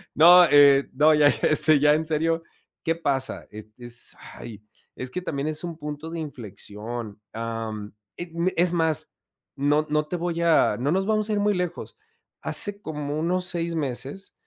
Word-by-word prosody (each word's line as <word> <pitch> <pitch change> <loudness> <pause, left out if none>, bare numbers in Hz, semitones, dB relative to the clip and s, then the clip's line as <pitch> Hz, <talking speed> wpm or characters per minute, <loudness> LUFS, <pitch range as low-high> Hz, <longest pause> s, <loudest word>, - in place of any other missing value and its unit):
no, 175 +3 +8
eh 140 -1 +6
no, 155 +1 +5
ya, 150 -1 +5
este, 150 0 +4
ya 150 +1 +5
en 155 +1 -1
serio, 165 +1 0 0.4
¿qué 165 0 0
pasa? 140 -5 -2
Es 110 0 -10
es 120 -1 -7 0.2
ay, 110 -3 -10 0.3
es 125 0 -6
que 180 - -4
también 145 -4 -3
es 155 +1 -3
un 170 -2 -5
punto 150 +1 -6
de 170 - -5
inflexión. 110 -4 -7
Am, 115 -2 -5 0.2
eh, 175 -1 -7 0.3
es 175 0 +3
más, 160 -3 0 0.5
no 145 +2 +1
no 150 0 +1
te 180 - -4
voy 170 0 -2
a 170 -2 +3
no 140 +4 0
nos 190 +2 +1
vamos 215 0 0
a - - 0
ir 205 - +1
muy 205 0 +2
lejos. 180 -1 -4 0.4
Hace 205 0 -1
como 150 -2 -4
unos 180 +3 -1
6 170 -1 -3
meses, 145 +5 -4
155 Hz, 175 wpm, -24 LUFS, 135-170 Hz, 0.5 s, no